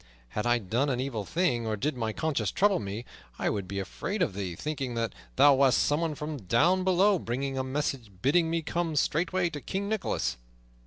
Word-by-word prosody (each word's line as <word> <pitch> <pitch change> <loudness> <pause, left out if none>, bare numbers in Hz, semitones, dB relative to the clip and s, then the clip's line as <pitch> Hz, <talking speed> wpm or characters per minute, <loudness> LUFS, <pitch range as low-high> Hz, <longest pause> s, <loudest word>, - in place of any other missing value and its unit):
Had 105 - -2
I 120 0 +4
done 120 +7 0
an 125 -2 0
evil 125 -6 -3
thing, 125 - 0
or 110 -1 -1
did 145 +6 -1
my 115 -3 -2
conscience 160 +5 -1
trouble 205 0 +3
me, 105 +3 -5 0.3
I - - 0
would 100 -3 -3
be 100 - -5
afraid 180 - -2
of 105 - -1
thee, 95 -3 -4
thinking 135 - -3
that 115 -1 -1 0.2
thou 145 - +7
wast 135 -1 +4
someone 155 +1 +1
from 150 0 -4
down 145 - +2
below 190 +1 +4
bringing 135 +2 -3
a 130 - -1
message 130 -3 -2
bidding 160 +4 +3
me 165 0 -1
come 165 0 -1
straightway 175 +4 +1
to 145 -2 -6
King 195 +7 -3
Nicholas." 215 -1 -1
140 Hz, 200 wpm, -29 LUFS, 115-165 Hz, 0.3 s, thou